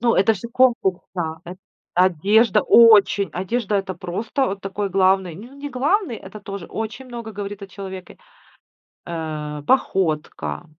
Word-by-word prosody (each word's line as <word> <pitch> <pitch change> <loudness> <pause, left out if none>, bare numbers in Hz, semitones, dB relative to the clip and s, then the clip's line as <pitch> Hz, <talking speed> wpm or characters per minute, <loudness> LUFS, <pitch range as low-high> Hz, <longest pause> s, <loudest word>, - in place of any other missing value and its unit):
Ну, 235 -1 +3
это 215 +3 +4
же 220 +4 -7
конкурс, 235 -7 +2
да. 160 -2 -3
Эт 180 +2 -9 0.4
Одежда- 190 +6 +3
очень! 210 -4 +6
Одежда- 205 +3 -2
это 195 -1 -2
просто 210 - -2
вот 195 0 -4
такой 195 +1 -3
главный 190 -2 +2
Не 215 +8 -10
не 280 +1 -7
главный, 285 - 0
это 205 +1 -11
тоже 200 -3 -7
очень 225 +4 -5
много 235 -3 -7
говорит 200 0 -6
о - - -6
человеке. 190 -1 -9 0.9
Э, 155 -3 -5
походка, 180 - 0
195 Hz, 145 wpm, -22 LUFS, 185-230 Hz, 0.9 s, очень